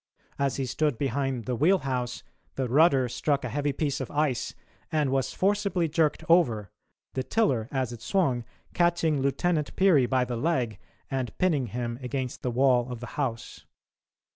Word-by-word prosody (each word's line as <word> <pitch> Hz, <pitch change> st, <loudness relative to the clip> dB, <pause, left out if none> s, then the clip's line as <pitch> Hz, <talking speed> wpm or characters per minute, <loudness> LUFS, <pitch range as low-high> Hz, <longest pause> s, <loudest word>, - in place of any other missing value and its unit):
As 140 Hz, -1 st, +1 dB
he 135 Hz, -, -1 dB
stood 145 Hz, 0 st, 0 dB
behind 135 Hz, -2 st, -1 dB
the 125 Hz, -, -1 dB
wheelhouse, 135 Hz, -6 st, +1 dB, 0.3 s
the 130 Hz, -1 st, -1 dB
rudder 135 Hz, 0 st, +4 dB
struck 140 Hz, +4 st, -1 dB
a -, -, -3 dB
heavy 145 Hz, 0 st, 0 dB
piece 140 Hz, 0 st, -2 dB
of 130 Hz, -, -4 dB
ice 145 Hz, -4 st, -1 dB, 0.4 s
and 150 Hz, -4 st, +1 dB
was 135 Hz, -1 st, 0 dB
forcibly 195 Hz, -3 st, +1 dB
jerked 160 Hz, 0 st, +1 dB
over, 120 Hz, -, +3 dB, 0.4 s
the 130 Hz, -, -1 dB
tiller, 130 Hz, -, +1 dB
as 130 Hz, -3 st, -1 dB
it 120 Hz, -, -10 dB
swung, 135 Hz, -7 st, +1 dB, 0.3 s
catching 165 Hz, -4 st, +2 dB
Lieutenant 150 Hz, +3 st, 0 dB
Peary 170 Hz, -10 st, +4 dB
by 130 Hz, -1 st, +2 dB
the 120 Hz, -1 st, -3 dB
leg 120 Hz, -, 0 dB, 0.3 s
and 130 Hz, -4 st, -3 dB
pinning 155 Hz, -9 st, +1 dB
him 120 Hz, +2 st, -4 dB
against 125 Hz, 0 st, -4 dB
the 125 Hz, -, -1 dB
wall 125 Hz, 0 st, +2 dB
of 120 Hz, -, -5 dB
the 120 Hz, -, -7 dB
house. 125 Hz, -6 st, -4 dB
135 Hz, 165 wpm, -27 LUFS, 125-155 Hz, 0.4 s, rudder